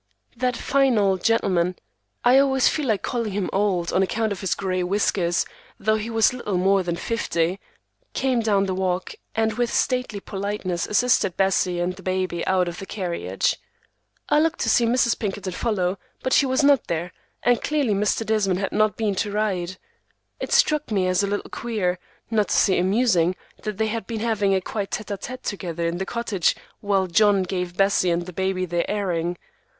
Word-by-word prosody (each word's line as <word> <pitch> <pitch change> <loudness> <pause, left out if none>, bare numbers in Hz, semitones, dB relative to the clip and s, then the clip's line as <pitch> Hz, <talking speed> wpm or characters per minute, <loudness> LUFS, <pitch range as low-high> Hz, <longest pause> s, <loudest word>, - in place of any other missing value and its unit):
That 250 0 -1
fine 270 -3 +2
old 195 -3 +2
gentleman—I 180 - +1
always 265 -2 +3
feel 300 -3 0
like 215 -4 0
calling 230 -5 -2
him 195 -2 -2
old 190 -4 0
on 190 - +3
account 215 +3 0
of 195 - -4
his 190 - 0
gray 185 -2 -1
whiskers, 180 -2 +1 0.3
though 215 +1 +2
he 220 +1 -4
was 225 +1 +3
little 210 -7 -2
more 195 +2 +3
than 175 -2 -2
fifty—came 230 - -2
down 205 -3 +2
the 190 - -2
walk 185 -1 -1 0.2
and 220 0 +1
with 240 +1 -1
stately 250 -5 0
politeness 195 -3 -3
assisted 210 -4 +2
Bessie 190 -2 +1
and 180 +1 -1
the - - -10
baby 185 -2 -1
out 185 -1 +2
of 175 0 -5
the 195 - -7
carriage. 180 -4 -1 0.7
I 295 - +4
looked 325 +2 +1
to 230 - +1
see 235 +1 +4
Mrs. 235 0 +2
Pinkerton 195 -3 -3
follow, 190 -4 -1 0.2
but 260 - 0
she 275 - +4
was 260 +3 +1
not 280 -3 +4
there, 170 +1 -2 0.3
and 245 -1 +3
clearly 285 -7 +1
Mr. 210 +2 0
Desmond 210 -4 +1
had 195 - -2
not 215 -1 +2
been 215 -3 0
to 205 +1 -1
ride. 190 -4 -1 0.6
It - - -5
struck 300 -2 +3
me 195 -4 +1
as 185 +1 +2
a 200 - 0
little 205 +1 -3
queer, 195 -7 -2 0.3
not 215 -2 +2
to - - +1
say 190 -3 +4
amusing, 185 -2 +2 0.3
that 210 -2 -4
they 220 - +1
had 225 -2 -4
been 225 -2 -4
having 205 -4 +1
a 190 - +1
quiet 200 +1 -4
tête 210 -1 -3
à - - -16
tête 255 +1 -7
together 170 -4 -3
in 170 +1 -1
the 190 - -3
cottage 225 -7 0 0.2
while 200 -2 +1
John 200 +2 +3
gave 180 -1 -4
Bessie 195 -2 +3
and 170 0 0
the 180 - -9
baby 190 0 -1
their 175 -1 -1
airing. 175 -4 -1
200 Hz, 190 wpm, -23 LUFS, 185-225 Hz, 0.7 s, I